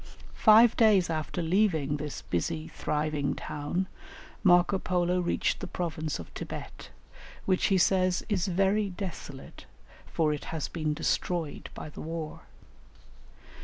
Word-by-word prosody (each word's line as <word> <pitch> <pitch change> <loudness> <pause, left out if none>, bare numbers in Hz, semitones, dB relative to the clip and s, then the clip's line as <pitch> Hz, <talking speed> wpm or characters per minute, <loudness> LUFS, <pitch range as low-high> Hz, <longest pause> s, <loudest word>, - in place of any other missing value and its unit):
Five 225 +1 +6
days 205 -7 +4
after 160 +2 -2
leaving 160 -5 +2
this 150 0 -6
busy, 80 -2 -2
thriving 150 -1 -1
town 150 +6 -3 0.6
Marco 180 +1 +5
Polo 180 0 +1
reached 175 - 0
the - - -5
province 155 -3 -3
of 85 - -9
Thibet, - - -8 0.6
which 185 -1 +2
he 195 - +3
says 185 0 +2
"is 200 -3 0
very 195 +3 +2
desolate, 175 -7 -8 0.4
for 155 -2 +1
it 150 - -6
has 160 -3 -3
been 155 -3 -2
destroyed 165 -1 -2
by - - -7
the - - -9
war." 160 -1 -5
175 Hz, 130 wpm, -29 LUFS, 150-190 Hz, 0.6 s, Five